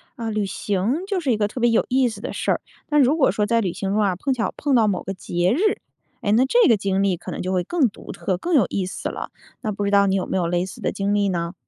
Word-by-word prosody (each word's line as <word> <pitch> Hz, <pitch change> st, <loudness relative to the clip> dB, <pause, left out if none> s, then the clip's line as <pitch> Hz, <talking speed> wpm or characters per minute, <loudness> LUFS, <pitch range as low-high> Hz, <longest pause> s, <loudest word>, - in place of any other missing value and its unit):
啊， 230 Hz, -3 st, -4 dB
旅 210 Hz, -2 st, -1 dB
行 205 Hz, -, -1 dB
就 395 Hz, -2 st, 0 dB
是 290 Hz, -7 st, 0 dB
一 225 Hz, -, +2 dB
个 205 Hz, -1 st, +1 dB
特 245 Hz, -, -7 dB
别 240 Hz, 0 st, +3 dB
有 230 Hz, -, +2 dB
意 255 Hz, -1 st, +3 dB
思 220 Hz, -, -9 dB
的 -, -, -5 dB
事 -, -, -1 dB
儿， -, -, 0 dB, 0.3 s
但 295 Hz, -1 st, +3 dB
如 280 Hz, +5 st, +3 dB
果 270 Hz, -, +4 dB
说 210 Hz, -, 0 dB
在 230 Hz, +1 st, +2 dB
旅 180 Hz, -4 st, -2 dB
行 195 Hz, -1 st, -3 dB
中 210 Hz, -, +1 dB
啊， 195 Hz, -3 st, +1 dB
碰 265 Hz, +9 st, -1 dB
巧 235 Hz, -3 st, -2 dB
碰 285 Hz, -2 st, +1 dB
到 225 Hz, -3 st, +4 dB
某 190 Hz, -3 st, -1 dB
个 195 Hz, -, -4 dB
节 175 Hz, -1 st, -1 dB
日， 280 Hz, -, -1 dB, 0.6 s
哎， 205 Hz, -, 0 dB
那 245 Hz, +4 st, +4 dB
这 475 Hz, -, +4 dB
个 225 Hz, -, +5 dB
经 195 Hz, 0 st, 0 dB
历 190 Hz, -3 st, +1 dB
可 -, -, -8 dB
能 -, -, -4 dB
就 185 Hz, +1 st, -2 dB
会 180 Hz, -1 st, +1 dB
更 285 Hz, -, +1 dB
独 -, -, -11 dB
特、 185 Hz, -, -2 dB
更 345 Hz, -, -3 dB
有 245 Hz, -9 st, +5 dB
意 195 Hz, -, -1 dB
思 185 Hz, -, -4 dB
了。 -, -, -6 dB, 0.3 s
那 215 Hz, -, -2 dB
不 205 Hz, 0 st, -3 dB
知 200 Hz, -, 0 dB
道 200 Hz, 0 st, +5 dB
你 190 Hz, -, +2 dB
有 190 Hz, -, 0 dB
没 -, -, -1 dB
有 175 Hz, -2 st, 0 dB
类 175 Hz, +1 st, 0 dB
似 190 Hz, -, -10 dB
的 -, -, 0 dB
经 200 Hz, +1 st, -1 dB
历 200 Hz, -1 st, +2 dB
呢？ 170 Hz, -1 st, -2 dB
205 Hz, 330 characters per minute, -22 LUFS, 190-245 Hz, 0.6 s, 个